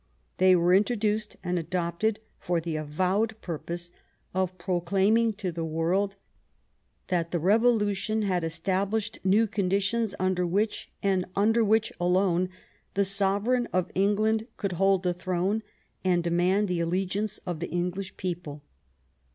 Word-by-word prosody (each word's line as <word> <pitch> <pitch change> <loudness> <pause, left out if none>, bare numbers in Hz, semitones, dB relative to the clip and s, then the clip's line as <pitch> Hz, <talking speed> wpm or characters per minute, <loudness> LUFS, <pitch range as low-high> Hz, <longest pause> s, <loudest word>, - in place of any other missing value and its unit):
They 185 0 +6
were 175 +1 +3
introduced 210 +1 +1
and 180 -1 0
adopt 170 +1 -3
ed 220 -1 +2 0.2
for 175 -1 0
the 165 -1 -4
avowed 185 +9 0
purpose 175 +1 -5 0.4
of 185 0 -1
proclaiming 195 +5 +2
to 195 -3 -4
the 165 0 -4
world 170 +5 0 0.9
that 170 -3 0
the 175 - -1
Bevolution 215 +2 +2
had 185 -4 0
established 195 +7 -1
new 200 +4 +4
conditions 200 +1 0
under 185 -1 +1
which, 205 +5 -1
and 190 -2 +2
under 225 +3 +3
which 220 +1 +2
alone, 180 0 +2 0.5
the 200 0 +3
sovereign 200 +5 +2
of 185 -1 0
England 215 +3 +1
could 200 -3 -2
hold 195 +1 +2
the 180 -1 +1
throne 185 +4 -1 0.4
and 180 -2 +2
demand 180 +4 +2
the 180 -2 -1
alle 180 +3 0
giance 205 +3 -3
of 175 -3 -3
the 175 - -4
English 180 +2 -3
people. 170 -5 -5
190 Hz, 140 wpm, -27 LUFS, 175-205 Hz, 0.9 s, They